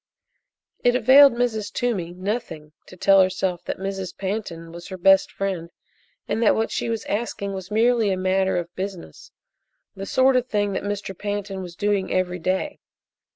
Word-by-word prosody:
It 245 0 +4
availed 270 +2 +7
Mrs. 235 -3 -1
Toomey 205 -9 -2
nothing 185 -6 -4 0.2
to 185 - -13
tell 195 +2 +5
herself 185 -1 0
that - - -3
Mrs. 195 -2 -5
Pantin 190 -5 -4
was 170 +1 -10
her 190 - -7
best 195 +1 +4
friend, 185 -4 -3 0.6
and 225 - -1
that 225 - +4
what 225 0 -1
she - - -2
was 225 -2 -3
asking 200 -2 -3
was 190 -1 -7
merely 225 0 +3
a 190 - 0
matter 190 0 +1
of 175 0 -4
business 190 -1 -7 0.7
the 195 0 -6
sort 260 +4 +3
of 250 0 +1
thing 205 -3 0
that - - -2
Mr. 205 -1 -4
Pantin 205 -1 -4
was 175 -2 -8
doing 205 0 0
every 180 -1 0
day. 190 - -2
195 Hz, 170 wpm, -23 LUFS, 185-220 Hz, 0.7 s, availed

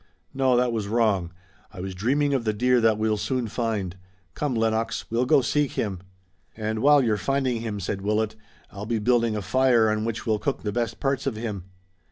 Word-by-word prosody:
"No, 130 -2 +2
that 125 0 +2
was 110 -3 -2
wrong. 105 -6 +1 0.4
I 105 - -11
was 95 +1 -5
dreaming 140 +9 +1
of 130 -4 0
the 110 -1 0
deer 125 +3 +2
that 110 -2 +3
we'll 110 0 +1
soon 125 +2 -1
find. 105 -6 -2 0.4
Come, 145 - -2
Lennox, 115 0 0
we'll 120 +2 +1
go 145 0 +5
seek 145 +2 0
him." 100 -4 -2 0.6
"And 110 0 -2
while 145 +3 +5
you're 110 -3 +1
finding 125 +4 0
him," 110 -3 -4
said 95 +1 -3
Willet, 105 +2 0 0.4
"I'll 100 +1 -7
be 115 0 0
building 115 +1 +2
the 105 -2 -3
fire 120 -2 +3
on 110 0 -1
which 115 +1 -3
we'll 110 -2 +1
cook 140 - -2
the 105 - -1
best 115 0 -2
parts 135 -1 -1
of 130 - -1
him." 105 -5 -5
115 Hz, 205 wpm, -25 LUFS, 105-125 Hz, 0.6 s, go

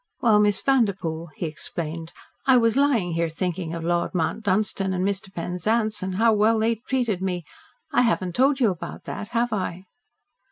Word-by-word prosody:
"Well, 220 -3 +4
Miss 205 -2 +3
Vanderpoel," 195 -11 +1
he - - -3
explained, 160 +1 -5 0.4
"I 260 -1 +7
was 230 -1 +3
lying 265 -10 +2
here 165 0 0
thinking 170 0 -3
of 165 - -5
Lord 175 +2 0
Mount 170 +5 0
Dunstan 195 -1 0
and 185 0 0
Mr. 200 0 -2
Penzance, 210 +5 -1
and 185 0 -3
how 225 +3 +4
well 215 +2 +3
they 225 +1 +2
treated 235 -8 0
me 180 -3 -2 0.5
I - - +5
haven't 190 -7 +1
told 270 +4 +3
you 230 -6 +4
about 175 - -7
that, 210 - -6
have 235 0 0
I? 185 -2 -3
195 Hz, 175 wpm, -24 LUFS, 175-225 Hz, 0.5 s, I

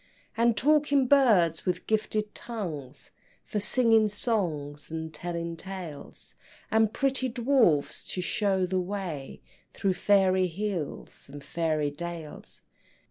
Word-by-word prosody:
And 235 0 +2
talking 290 -1 +3
birds 215 - +4
with 180 -1 -2
gifted 215 -1 -1
tongues, 170 - -6 0.3
For 210 - -2
singing 225 0 +3
songs 165 - -2
and 160 0 -5
telling 170 +1 -4
tales, 180 -4 -6 0.4
And 220 -1 +3
pretty 265 +1 0
dwarfs 235 - +2
to - - -3
show 195 -1 +1
the 185 +1 0
way 180 -7 -5 0.3
Through 195 -1 +1
fairy 185 -1 +3
hills 180 -7 -5
and 145 0 -9
fairy 155 -2 -1
dales. 165 0 -8
190 Hz, 115 wpm, -28 LUFS, 165-220 Hz, 0.4 s, birds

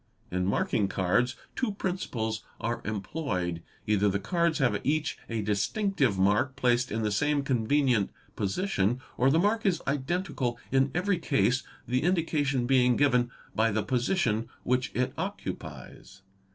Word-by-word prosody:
In 90 0 0
marking 100 +1 +1
cards 100 +7 +1 0.2
two 245 -6 -1
principles 120 - -2 0.2
are 115 0 -2
employed. 95 - -2 0.2
Hither 105 -1 +3
the 100 +1 0
cards 170 - +1
have 135 -4 +1
each 155 +2 0
a 115 -2 -2
distinctive 130 - +1
mark 105 +8 +2
placed 125 0 +2
in 110 +1 -1
the 105 - 0
same 145 +7 +1
convenient 125 -3 +2 0.3
position, 110 - 0 0.2
or 130 - +3
the 150 - +3
mark 210 +6 +2
is 190 -4 +2
identical 140 -3 -1
in 135 +1 +3
every 180 +1 +1
case, 135 -4 +2 0.3
the 125 +1 +1
indication 150 -7 +1
being 125 -1 +4
given 125 -4 +3 0.2
by 110 +1 +3
the 105 0 0
position 120 - 0
which 125 0 +1
it 125 +1 0
occupies. 95 - -6
125 Hz, 140 wpm, -28 LUFS, 110-150 Hz, 0.3 s, being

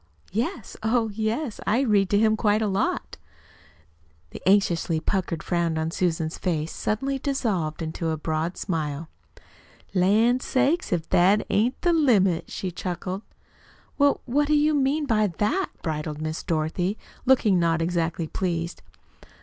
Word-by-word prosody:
"Yes, 225 +1 -3
oh, 225 0 +1
yes. 220 +4 -2
I 235 +5 +3
read 205 -7 +3
to 205 - +3
him 220 +1 +4
quite 215 -1 +2
a - - +1
lot." 195 -1 -1 1.1
The - - -9
anxiously 175 -5 +2
puckered 175 -1 -2
frown 170 -2 0
on 160 +1 -1
Susan's 165 -2 -1
face 160 -3 -1
suddenly 270 +6 -1
dissolved 200 - -1
into 160 +1 -3
a 160 - -1
broad 160 +3 -2
smile. 155 -3 -3 0.8
"Lan' 215 +7 +3
sakes, 275 +6 +1
if 170 -3 -1
that 195 +4 +4
ain't 235 +5 +1
the 350 -1 +3
limit!" 205 - +3
she 185 - -4
chuckled. 185 +2 -4 0.8
"Well, 285 0 +3
what 285 +4 +1
do 305 - +3
you 300 +1 +3
mean 290 +2 +1
by 215 -5 +2
that?" 370 - +1
bridled 150 -1 -3
Miss 155 +1 -3
Dorothy, 170 +5 -1 0.3
looking 220 -8 +4
not 165 -1 +2
exactly 165 0 -1
pleased. 170 0 -3
195 Hz, 140 wpm, -25 LUFS, 165-235 Hz, 1.1 s, him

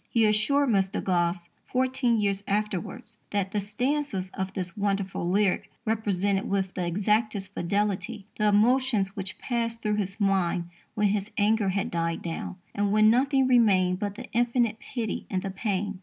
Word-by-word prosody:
He 230 -2 +3
assured 230 +7 +3
Mr. 195 -3 +1
Gosse, 175 -1 0 0.2
fourteen 255 -2 +1
years 200 -1 0
afterwards, 210 +3 -3
that 200 -2 -1
"the 210 - 0
stanzas 210 -2 -2
of 190 0 -4
this 180 -3 -3
wonderful 195 -3 -1
lyric 195 0 +1 0.2
represented 205 -3 0
with 190 -1 0
the 180 -2 -2
exactest 205 +1 0
fidelity 200 +3 -1
the 210 - +3
emotions 215 -1 +3
which 190 -1 -5
passed 230 -2 -2
through 210 0 +1
his 195 0 -3
mind 180 -3 +1 0.2
when 210 -1 +2
his 205 0 -1
anger 210 -1 +2
had 195 +1 -1
died 165 -1 -1
down, 170 +2 -4 0.2
and 205 0 0
when 215 +1 +6
nothing 270 +2 +3
remained 190 -7 +4
but 205 -1 -3
the - - -7
infinite 235 -1 +1
pity 230 -6 -4
and 185 -1 -2
the 195 - -3
pain." 200 0 -2
205 Hz, 160 wpm, -27 LUFS, 190-225 Hz, 0.2 s, when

